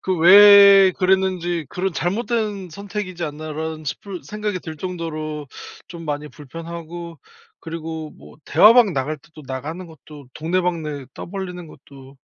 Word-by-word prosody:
그 190 - -1
왜 200 +2 +8
그랬는지, 185 -3 0
그런 190 +1 -3
'잘못된 205 0 -2
선택이지 195 -2 -5
않나.'라는 155 +1 -5
싶은 185 +5 -6
생각이 210 -3 -4
들 160 -1 -8
정도로 155 -4 -5 0.4
좀 170 -1 -9
많이 150 0 -4
불편하고 165 +3 -9 0.4
그리고 160 -1 -6
뭐 - - -16
대화방 215 +5 +6
나갈 145 +2 -2
때도 155 +1 -16
나가는 150 +8 -6
것도 150 -3 -14
동네방네 160 -4 -2
떠벌리는 180 -2 -7
것도 135 -2 -15
170 Hz, 295 characters per minute, -21 LUFS, 155-190 Hz, 0.4 s, 왜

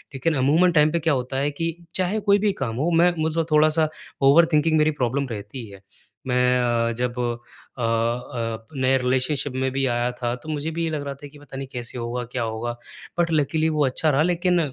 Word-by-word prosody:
लेकिन 155 +4 0
अमूमन 155 +7 +4
टाइम 150 -1 +4
पे 170 - 0
क्या 160 -1 +1
होता 130 0 -2
है 145 +2 0
कि 165 +3 -3 0.2
चाहे 190 +4 0
कोई 200 0 +3
भी 205 0 +2
काम 115 -1 -3
हो 150 +7 0
मैं 170 +2 +5
मतलब 160 +1 0
थोड़ा-सा 155 +1 +4 0.4
ओवरथिंकिंग 160 0 +4
मेरी 155 0 +3
प्रॉब्लम 135 +3 0
रहती 110 +3 -6
है। 100 -1 -13 0.5
मैं 125 0 +3 0.3
अ, - - -1
जब 125 0 -2 0.6
अ - - -5
अ, 115 0 -2
नए 130 0 +2
रिलेशनशिप 130 +2 0
में 130 0 0
भी 135 0 0
आया 120 0 0
था 120 0 -1
तो 155 - -9
मुझे 155 +1 -2
भी 165 +1 -2
ये 165 - 0
लग 150 -2 -3
रहा 140 - -3
था - - -6
कि 145 +1 -16
पता 140 -2 -10
नहीं 135 -1 -5
कैसे 120 0 -6
होगा 120 +1 -3
क्या 120 -2 -2
होगा 115 +2 -3 0.5
बट 170 -1 +2
लकिली 155 +1 +1
वो 150 -2 +1
अच्छा 145 +4 +1
रहा 145 +1 +3
लेकिन 180 0 +2
140 Hz, 210 wpm, -23 LUFS, 125-160 Hz, 0.6 s, मैं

